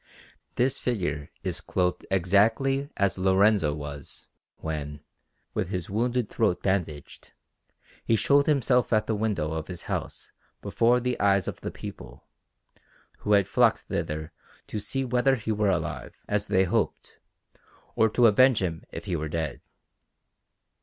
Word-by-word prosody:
This 125 +2 +1
figure 80 - -2
is 90 -1 -2
clothed 90 -2 -1
exactly 110 +9 +2
as 100 -2 +1
Lorenzo 95 -4 +3
was, 70 -2 -7 0.3
when, 75 -2 -5 0.5
with - - -2
his 90 -1 -4
wounded 120 +2 0
throat 90 - 0
bandaged, 85 -7 -3 0.7
he 115 - +2
showed 140 +5 +3
himself 130 -4 +2
at 110 -1 +3
the 110 - -1
window 105 -8 -1
of 80 -1 -4
his 90 -2 -7
house - - -5 0.3
before 120 +2 +2
the 125 0 -2
eyes 100 -2 +3
of - - -5
the - - -3
people, - - -10 1.0
who 105 - 0
had 100 -2 +4
flocked - - +3
thither 75 0 -4 0.3
to 105 - -4
see 135 +6 -2
whether 125 +2 +2
he 110 -2 -3
were 105 -1 +1
alive, 85 -5 -2
as 105 0 -1
they 95 - +3
hoped, 95 - -2 0.8
or 110 - +4
to 120 +3 +3
avenge 125 +3 +5
him 85 -4 -2
if - - -7
he 95 -4 -2
were 80 -1 -3
dead. 80 -2 -3
100 Hz, 145 wpm, -27 LUFS, 85-115 Hz, 1.0 s, avenge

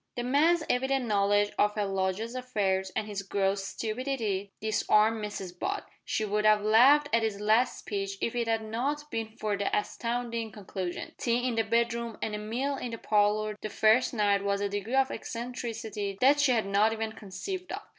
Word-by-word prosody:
The 240 - -2
man's 310 +6 +3
evident 265 +1 +1
knowledge 205 -1 +2
of 210 0 +3
her 210 -1 0
lodger's 195 +4 -2
affairs, 205 -7 -1
and 215 - -1
his 205 -2 -4
gross 195 0 0
stupidity, 215 -2 -3
disarmed 215 0 +2
Mrs 190 -4 -6
Butt. 405 +1 -3 0.2
She 220 - -1
would 210 +1 0
have 215 -1 +4
laughed 260 +8 +6
at 230 - +4
his 220 -3 -1
last 220 +4 +2
speech 195 -1 -4
if 230 - -1
it 240 -1 -1
had 225 -1 0
not 280 +7 -3
been 225 -1 -2
for 215 -3 -1
the 200 0 -1
astounding 230 +1 -3
conclusion. 190 -3 -5
Tea 245 +1 +1
in 250 - 0
the 225 - +2
bedroom 235 +1 0
and 215 - -3
a 210 - -3
mill 250 +7 -2
in 250 - -4
the 230 - -5
parlour 210 0 +1
the 215 - -4
first 220 +4 +3
night 205 -2 +2
was 200 0 0
a 205 - 0
degree 205 +5 -3
of 270 -1 +3
eccentricity 225 -4 -5 0.2
she 290 -2 +3
had 225 -4 +2
not 205 +3 +3
even 220 0 -3
conceived 360 - -6
of. 400 +2 -5
220 Hz, 185 wpm, -29 LUFS, 205-245 Hz, 0.2 s, laughed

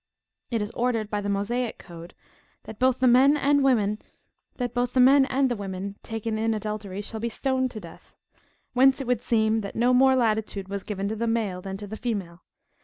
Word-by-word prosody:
It 230 -3 -1
is 210 - -6
ordained 230 -3 -1
by 210 -1 -1
the 205 - -3
Mosaic 225 +5 -1
code, 170 -1 -12 0.5
that 215 - -10
both 255 0 +3
the 255 - +2
men 265 +4 +5
and 285 0 +3
the 250 +3 +1
women 195 0 -5
taken 225 0 -4
in 225 0 +1
adultery 210 -2 -5
shall 220 +2 -6
be 235 +2 -2
stoned 260 +2 -1
to 225 - -8
death; 170 -5 -14 0.6
whence 265 +2 +4
it 270 - -4
would 245 -2 0
seem, 220 -2 +1
that 200 - -7
no 245 +2 +3
more 265 +1 +5
latitude 215 -5 -1
was 200 0 -4
given 200 0 -4
to 220 - -3
the 230 +2 -2
male 215 -5 -1
than 190 +1 -6
to 205 - -8
the 215 +2 -7
female. 195 -8 -4
225 Hz, 180 wpm, -25 LUFS, 205-250 Hz, 0.6 s, men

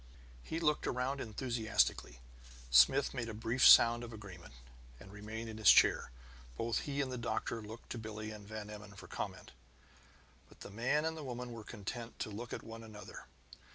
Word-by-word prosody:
He 160 - -4
looked 150 -2 +1
around 130 +2 -1
enthusiastically. 110 - 0 0.5
Smith 65 - +6
made 120 -3 -3
a 110 - -6
brief 115 +3 -1
sound 120 +1 +8
of 120 - -7
agreement, 95 - -11 0.4
and 95 - -13
remained 105 +3 -7
in 110 -1 -7
his 105 - +6
chair. - - +6 0.5
Both 115 0 0
he 140 0 0
and 130 -2 -2
the 125 - -4
doctor 115 0 -2
looked 110 +2 -10
to 120 - -4
Billie 110 -1 -6
and 105 -1 -10
Van 105 -1 -7
Emmon 105 -1 -10
for - - -11
comment. - - -6 1.0
But - - -20
the - - -9
man 130 +8 +1
and 160 0 -1
the 155 - -7
woman 125 -2 -5
were 115 -2 -8
content 115 +4 -7
to 110 - -4
look 115 +3 -7
at - - -5
one 115 0 -9
another. 110 -2 -11
115 Hz, 185 wpm, -34 LUFS, 105-125 Hz, 1.0 s, sound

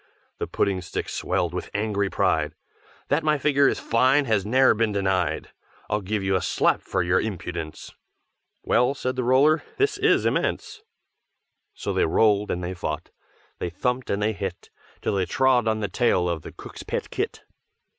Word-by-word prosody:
The - - -2
Pudding 95 -2 0
stick 90 - -4
swelled 90 -1 -1
with 90 - -4
angry 105 -1 0
pride, 80 -4 0 0.5
"That 150 +3 +2
my 155 -1 +2
figure 140 0 +3
is - - +1
fine 130 +5 +3
has 110 -5 +1
ne'er 130 +4 +5
been 110 0 0
denied, 95 -5 -1 0.4
I'll 105 0 +1
give 100 +1 -2
you 95 0 +1
a 95 - +1
slap - - +1
for - - -1
your 90 +1 +2
impudence!" 85 -6 -5 0.7
"Well!" 125 +3 +2
said 130 -1 -2
the 130 - -1
Roller: 140 +6 +4 0.2
"This 415 +1 +1
is - - +3
immense!" 430 - -1 0.9
So - - -3
they - - +2
rolled 105 -2 +3
and 90 - -2
they 90 +1 -3
fought, 80 -3 -5 0.5
They 90 - -2
thumped 125 +8 -2
and 100 +1 0
they 110 +1 +1
hit. 95 -3 -6 0.3
Till - - 0
they 95 -2 0
trod 125 +4 +3
on 110 0 0
the 105 - 0
tail 95 -3 +1
of 85 -2 -2
the - - -9
cook's - - -10
pet - - -4
kit. - - -3
105 Hz, 175 wpm, -24 LUFS, 90-130 Hz, 0.9 s, ne'er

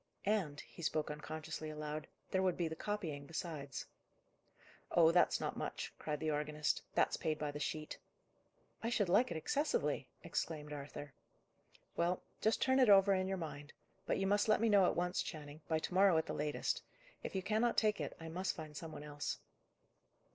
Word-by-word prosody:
"And," 190 -9 +1
he - - -13
spoke 155 -2 0
unconsciously 155 +1 -5
aloud, 150 0 -4 0.2
"there 190 - +2
would 185 -2 +2
be 170 - +1
the 160 - -4
copying 160 -8 -3
besides." 155 -4 -4 1.0
"Oh, 165 -1 +6
that's 175 +1 +4
not - - -2
much," - - -4
cried 150 -1 -2
the 155 0 0
organist. 150 0 0
"That's - - +3
paid 155 -1 0
by 150 -1 -2
the 145 - -6
sheet." 155 +1 -3 0.8
"I 230 - 0
should 205 -6 +1
like 205 +8 +5
it 170 - -2
excessively!" 285 - 0 0.2
exclaimed 150 -2 -3
Arthur. 145 0 -7 0.8
"Well, 175 +1 +1 0.2
just 220 - +3
turn 260 0 +4
it 255 -4 +6
over 195 0 +8
in 185 0 +1
your 190 0 -1
mind. 150 -3 -6 0.3
But - - +2
you 195 - 0
must 205 +2 +3
let 215 - +5
me 230 +1 +3
know 200 -3 +6
at - - +1
once, 180 0 +1
Channing; 150 -1 -7
by 160 - +2
to 160 - -3
morrow 190 -2 +6
at 160 - +2
the - - -3
latest. 150 0 -1 0.4
If - - -5
you 190 - 0
cannot 220 +4 +2
take 215 -1 +3
it, - - -4
I 165 - -7
must 180 +4 -1
find 155 -3 -8
some 160 +1 -6
one 150 - -7
else." 145 -1 -3
160 Hz, 190 wpm, -37 LUFS, 150-195 Hz, 1.0 s, over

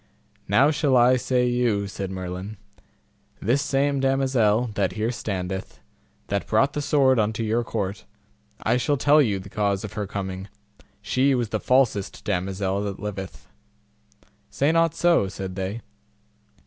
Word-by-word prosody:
Now 130 +10 +4
shall 145 -4 +2
I 125 +1 +5
say 125 0 +1
you, 120 -5 +1
said 100 -1 -5
Merlin; 95 +2 -6 0.8
this 125 +7 +1
same 140 0 +1
damosel 130 -4 +2
that 100 -2 0
here 110 +2 -1
standeth, 95 -5 -5 0.5
that 100 0 -2
brought 135 +6 +2
the 150 - -2
sword 135 -3 +3
unto 110 +1 0
your 115 +2 0
court, 100 -4 -4 0.6
I 125 - +2
shall 145 +4 +1
tell 145 +3 +5
you 105 -8 +1
the 95 +1 -9
cause 100 -1 -1
of 105 - -7
her 105 -2 -3
coming: 95 -1 -5 0.6
she 135 +1 +2
was 120 -3 -1
the 110 - -1
falsest 125 -6 +1
damosel 95 0 -1
that 100 -1 -5
liveth. 95 -2 -7 1.0
Say 140 +3 +1
not 165 -1 +2
so, 170 - +3
said 95 -1 -6
they. 95 +4 -4
110 Hz, 150 wpm, -24 LUFS, 100-130 Hz, 1.0 s, I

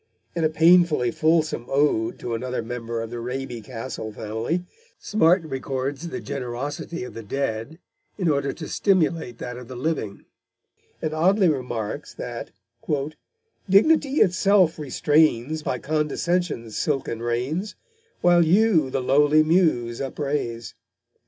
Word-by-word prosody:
In 170 - 0
a 155 - +3
painfully 160 -6 +4
fulsome 155 -6 +1
ode 135 -5 +1
to 120 - -5
another 125 +1 -3
member 115 0 -4
of 115 - -8
the 120 - -5
Raby 125 0 -4
Castle 115 -2 -6
family, 110 +12 -3 0.3
Smart 180 -3 +3
records 135 +1 -4
the 190 +2 -5
generosity 140 +3 -5
of 125 - -8
the 115 - -7
dead 115 +4 -3 0.4
in 185 -4 -1
order 140 -2 +1
to 155 - -8
stimulate 165 - +1
that 125 +1 -6
of 125 -1 -10
the 130 - -8
living, 125 -7 -3 0.8
and 155 - -1
oddly 185 +5 +3
remarks 125 -7 -3
that - - -6 1.2
dignity 280 +8 +4
itself 185 -2 +4
restrains 150 0 +2
By 130 - -2
condescension's 150 -3 -1
silken 135 -6 -1
reins, 130 - -2 0.5
While 175 -1 +5
you 175 -3 +3
the 130 0 -2
lowly 145 +3 +4
Muse 155 -9 +2
upraise. 135 -6 -3
145 Hz, 125 wpm, -24 LUFS, 120-165 Hz, 1.2 s, While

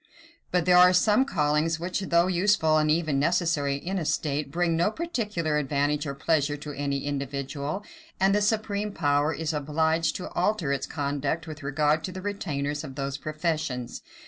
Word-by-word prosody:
But 180 -2 +1
there 180 0 +6
are 180 0 +9
also 180 0 +5
some 215 +6 +3
callings 155 - +1
which, 180 +3 -2
though 170 -3 +2
useful 180 -4 +3
and 155 0 +1
even 155 -3 +1
necessary 155 -3 +1
in 185 +7 -3
a - - -2
state, 150 -1 -1
bring 170 0 +1
no 170 +5 +2
particular 210 - -2
advantage 145 +1 0
or 140 - -4
pleasure 145 0 +1
to 145 0 -7
any 140 -1 -2
individual; 140 +4 -3 0.4
and 195 +1 +4
the 205 - +2
supreme 210 -1 0
power 145 -2 +1
is 160 0 -2
obliged 160 +2 0
to 180 - -6
alter 205 -10 0
its 140 - -2
conduct 145 +3 -2
with 155 -2 -8
regard 150 +2 +1
to 185 - -5
the 185 0 -8
retainers 150 -8 -3
of 135 -4 -8
those 135 -1 -3
professions. 155 -5 -3
155 Hz, 175 wpm, -26 LUFS, 145-180 Hz, 0.4 s, are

